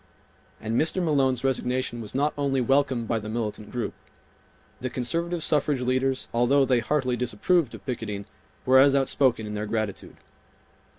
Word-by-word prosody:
And 110 +2 0
Mr. 160 +4 0
Malone's 135 -7 +1
resignation 125 -2 -1
was 110 +2 -7
not 145 +2 +1
only 140 -2 0
welcomed 130 -2 +1
by 115 0 0
the 105 0 -7
militant 110 -2 -4
group. 120 -2 -3 0.9
The 130 - -3
conservative 170 +7 -2
suffrage 145 -3 +1
leaders, 130 +1 0
although 130 +4 +3
they 125 -2 +3
heartily 130 0 0
disapproved 125 - 0
of, - - -14
picketing, 110 -6 -4 0.4
were 130 +1 +6
as 140 +1 +6
outspoken 130 -4 +2
in 105 - -6
their 105 0 -3
gratitude. 110 -2 -4
130 Hz, 155 wpm, -26 LUFS, 115-140 Hz, 0.9 s, were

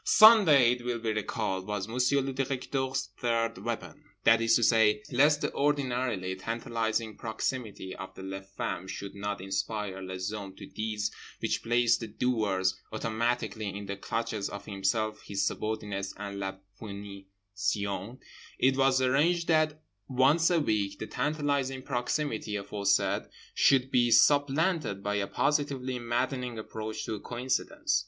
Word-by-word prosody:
Sunday, 185 - +8
it 125 -1 -3
will 120 -1 -1
be 115 -1 -1
recalled, 105 -3 -2
was 105 -2 -2
Monsieur 125 +4 +2
le 135 0 -3
Directeur's 130 -3 -2
third 115 -1 0
weapon. - - -5 0.2
That 115 0 +6
is 115 - +4
to 120 - +3
say: 105 -2 +4
lest 145 +4 +4
the - - -1
ordinarily 125 -9 0
tantalising 115 +1 -2
proximity 110 -4 -4
of 95 0 -9
les 95 0 -6
femmes 95 +2 -3
should 100 0 -6
not 100 -1 -4
inspire 95 0 -3
les 95 +1 -4
hommes 100 -3 -7
to - - -9
deeds 105 -1 -3 0.3
which - - -1
placed 120 0 +3
the 115 - -5
doers 105 -5 0
automatically 110 -1 -1
in 100 +1 -6
the 100 0 -4
clutches 110 0 -3
of 100 - -7
himself, 105 +2 -1
his 100 -1 -2
subordinates, 105 -2 -3
and 100 0 -5
la 95 -1 -3 0.3
punition, 100 +1 -4 0.4
it 130 +1 +3
was 135 -1 +3
arranged 165 +7 +2
that 155 -1 +2 0.2
once 140 +6 +4
a 175 -2 +3
week 100 -8 0
the 110 - -5
tantalising 140 -2 -1
proximity 120 -4 -2
aforesaid 100 0 0 0.3
should 135 -1 +4
be 120 -1 +4
supplanted 145 - +3
by 105 - -1
a 100 -1 0
positively 135 -4 0
maddening 125 +1 -2
approach 110 0 -5
to 110 - -3
coincidence. 130 - -1
115 Hz, 140 wpm, -29 LUFS, 100-130 Hz, 0.4 s, Sunday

